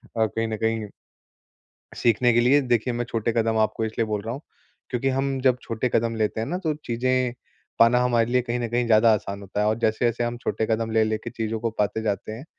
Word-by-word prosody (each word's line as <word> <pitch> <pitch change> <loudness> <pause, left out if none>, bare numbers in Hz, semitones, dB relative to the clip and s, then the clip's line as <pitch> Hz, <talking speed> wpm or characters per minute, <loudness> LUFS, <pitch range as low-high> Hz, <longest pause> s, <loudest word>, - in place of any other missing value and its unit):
अ, 110 -1 +3
कहीं 115 +2 -2
न 110 - -3
कहीं 110 -1 -1 1.1
सीखने 120 +1 +3
के 120 - +4
लिए। 140 +4 +4
देखिए 120 -1 0
मैं 120 0 -2
छोटे 115 0 -1
कदम 115 0 +1
आपको 110 +1 0
इसलिए 110 +1 -1
बोल 105 -1 -2
रहा 115 +3 -4
हूँ, 140 - -7 0.5
क्योंकि 130 +2 0
हम 135 0 -1
जब 130 -2 +3
छोटे 115 +2 -2
कदम 115 0 +1
लेते 110 0 -1
हैं 115 - -3
ना 180 - -2
तो 155 - +2
चीज़ें 125 +1 0 0.5
पाना 115 +2 +6
हमारे 120 -2 +2
लिए 125 0 +3
कहीं 120 0 -3
न 120 - -1
कहीं 120 +1 0
ज़्यादा 110 0 +5
आसान 100 -1 -3
होता 100 +1 -3
है। 105 - +2
और 110 - +2
जैसे-जैसे 115 +1 +1
हम 120 0 -3
छोटे 115 -2 -2
कदम 110 0 0
ले 110 0 +3
लेके 110 0 -3
चीज़ों 110 -1 -3
को 115 +1 -1
पाते 105 +2 0
जाते 105 0 -2
हैं, 130 +7 -9
115 Hz, 230 wpm, -24 LUFS, 110-125 Hz, 1.1 s, पाना